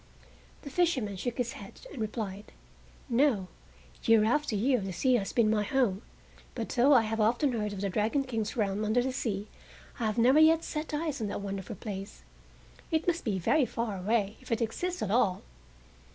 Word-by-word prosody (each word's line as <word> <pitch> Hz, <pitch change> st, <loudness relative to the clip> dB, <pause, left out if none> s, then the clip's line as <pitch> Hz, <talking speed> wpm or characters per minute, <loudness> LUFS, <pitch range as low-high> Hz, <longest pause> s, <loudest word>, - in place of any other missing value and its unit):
The 280 Hz, -, -8 dB
fisherman 265 Hz, -, +1 dB
shook 235 Hz, +6 st, -4 dB
his 240 Hz, -2 st, -1 dB
head 200 Hz, -1 st, -11 dB
and 250 Hz, -, -6 dB
replied; 210 Hz, -2 st, -5 dB, 0.5 s
"No; 235 Hz, -7 st, +2 dB, 0.5 s
year 225 Hz, -1 st, +5 dB
after 245 Hz, +1 st, +1 dB
year 250 Hz, +5 st, +2 dB
the 195 Hz, -1 st, -4 dB
sea 255 Hz, +8 st, +1 dB
has 205 Hz, -5 st, +1 dB
been 235 Hz, -3 st, +3 dB
my 215 Hz, -1 st, +2 dB
home, 210 Hz, -3 st, +1 dB, 0.5 s
but 230 Hz, -3 st, -4 dB
though 255 Hz, +4 st, +3 dB
I 245 Hz, -4 st, +6 dB
have 220 Hz, 0 st, -1 dB
often 240 Hz, +6 st, +2 dB
heard 210 Hz, -3 st, -2 dB
of 200 Hz, -1 st, -6 dB
the 200 Hz, -, 0 dB
Dragon 220 Hz, +8 st, +1 dB
King's 225 Hz, -3 st, -3 dB
realm 205 Hz, -1 st, 0 dB
under 220 Hz, +3 st, +2 dB
the 260 Hz, 0 st, -2 dB
sea 210 Hz, -5 st, -3 dB, 0.5 s
I 230 Hz, -, 0 dB
have 215 Hz, -, -2 dB
never 255 Hz, +6 st, +5 dB
yet 320 Hz, +1 st, +6 dB
set 305 Hz, +1 st, -4 dB
eyes 300 Hz, -3 st, -2 dB
on 215 Hz, -, -1 dB
that 200 Hz, -, -4 dB
wonderful 195 Hz, -1 st, -5 dB
place. 200 Hz, -2 st, -7 dB, 0.7 s
It 320 Hz, -1 st, 0 dB
must 345 Hz, -1 st, +1 dB
be 205 Hz, -4 st, -1 dB
very 250 Hz, -, +2 dB
far 225 Hz, -2 st, -3 dB
away, 205 Hz, +2 st, 0 dB
if 255 Hz, -, -12 dB
it 230 Hz, -, +1 dB
exists 350 Hz, +11 st, -2 dB
at 200 Hz, -, -2 dB
all!" 210 Hz, -5 st, +2 dB
225 Hz, 195 wpm, -30 LUFS, 205-260 Hz, 0.7 s, I